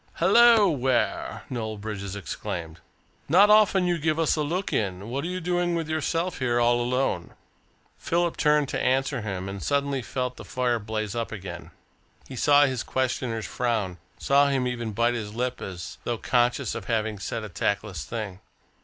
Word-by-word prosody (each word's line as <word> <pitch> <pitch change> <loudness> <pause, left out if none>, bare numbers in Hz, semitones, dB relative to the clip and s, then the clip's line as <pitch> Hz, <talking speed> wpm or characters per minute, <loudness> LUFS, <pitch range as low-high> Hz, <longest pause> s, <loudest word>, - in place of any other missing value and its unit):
"Hullo, 235 -3 +6
Ware!" 130 -6 0
Noel 110 -3 -3
Bridges 100 -2 -5
exclaimed. 85 -3 -5 0.5
"Not 200 +7 +6
often 205 -3 +5
you 175 -1 +1
give 155 0 0
us 165 -1 +2
a 155 - -1
look 175 +6 -2
in. 100 0 -2
What 135 +3 -2
are - - -2
you 180 +1 -3
doing 175 0 0
with 165 -2 -2
yourself 165 +3 -1
here 120 -2 +1
all 120 0 +3
alone?" 125 -8 -1 0.6
Philip 170 0 0
turned 150 -1 +3
to - - -2
answer 135 0 +1
him, 95 -3 -4
and 100 0 -6
suddenly 140 -1 0
felt 125 0 -3
the - - -8
fire 125 -2 0
blaze 110 -1 -3
up 115 -1 -3
again. 95 -4 -7 0.6
He 130 - -8
saw 145 +3 +5
his 130 -3 -1
questioner's 125 -3 -2
frown, 110 -8 -2 0.2
saw 140 +1 +4
him 135 -2 +1
even 120 -3 -3
bite 120 +3 +1
his 110 -3 -5
lip 125 +1 -2
as 90 -3 -7
though 120 - -2
conscious 120 +1 +1
of - - -6
having 110 -3 -1
said 115 +3 -4
a - - -5
tactless 100 -3 -2
thing. 95 - -5
125 Hz, 175 wpm, -26 LUFS, 110-145 Hz, 0.6 s, Hullo